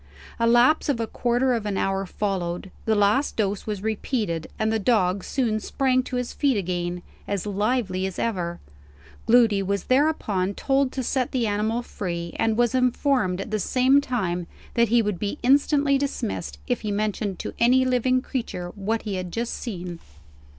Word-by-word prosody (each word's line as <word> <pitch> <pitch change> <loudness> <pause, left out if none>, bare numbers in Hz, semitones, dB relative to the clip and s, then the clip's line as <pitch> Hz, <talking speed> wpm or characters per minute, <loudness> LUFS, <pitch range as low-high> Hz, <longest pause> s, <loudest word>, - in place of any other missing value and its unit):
A 230 - +3
lapse 245 +7 +4
of 265 -5 +1
a 230 - 0
quarter 245 +3 +1
of 225 -3 -2
an 200 -2 -1
hour 195 0 0
followed; 185 -2 -3
the 220 - +2
last 210 +8 +2
dose 205 -1 -1
was 205 -2 -3
repeated; 215 - -2
and 220 0 0
the 220 - +1
dog 195 -4 +2
soon 230 -5 0
sprang 255 +4 +1
to 255 - -6
his 250 -1 -2
feet 275 -6 +1
again, 175 -2 -2 0.2
as 200 -2 -2
lively 205 -2 0
as 190 - -7
ever. 175 -7 -2 0.7
Gloody 225 -4 +5
was 200 0 -1
thereupon 225 -9 +1
told 270 -1 +1
to 260 - -2
set 255 0 -1
the 250 -3 0
animal 220 +3 0
free; 170 -6 -5
and 225 -1 +1
was 240 0 +2
informed 250 -6 +1
at 200 - -7
the 215 - 0
same 260 +6 +3
time 185 -10 -2 0.3
that 235 0 +3
he 235 0 +4
would 205 -4 -2
be 205 +7 -2
instantly 280 +1 +3
dismissed, 260 -10 -3
if 245 - -1
he 215 - -3
mentioned 205 -1 -1
to - - -5
any 255 +2 +4
living 255 0 +2
creature 225 -11 -4
what 220 +3 -2
he 205 -3 -3
had 180 -1 -5
just 235 +4 -2
seen. 180 -7 -6
220 Hz, 180 wpm, -24 LUFS, 195-250 Hz, 0.7 s, Gloody